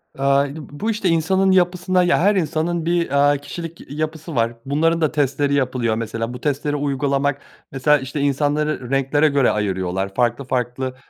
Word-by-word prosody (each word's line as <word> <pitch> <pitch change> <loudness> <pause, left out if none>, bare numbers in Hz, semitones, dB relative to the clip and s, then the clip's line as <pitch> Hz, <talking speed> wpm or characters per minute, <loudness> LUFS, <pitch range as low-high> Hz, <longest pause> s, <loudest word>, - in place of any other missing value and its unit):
Eee, 135 - -5
b 140 +1 +2
b 145 -2 -10
bu, 225 +1 0
işte, 210 -3 -1
insanın 190 +4 +2
yapısına 180 0 +2
ya, 175 - +3
her 200 +4 +3
insanın 165 -1 -1
bir, 170 0 +1
aaa, 145 0 +3
kişilik 165 +1 -9
yapısı 155 0 -4
var. 115 0 +1
Bunların 165 +4 +1
da 155 - +2
testleri 140 -1 0
yapılıyor. 125 -4 0
Mesela 115 +1 -4
bu 125 - -9
testleri 145 0 -1
uygulamak 140 0 0 0.3
mesela, 140 +2 +3
işte, 135 +3 -5
insanları 145 -1 0
renklere 135 +3 +2
göre 140 -3 +3
ayırıyorlar 95 -2 -2
farklı 125 +3 +1
farklı, 130 0 -2
145 Hz, 170 wpm, -20 LUFS, 130-160 Hz, 0.3 s, ya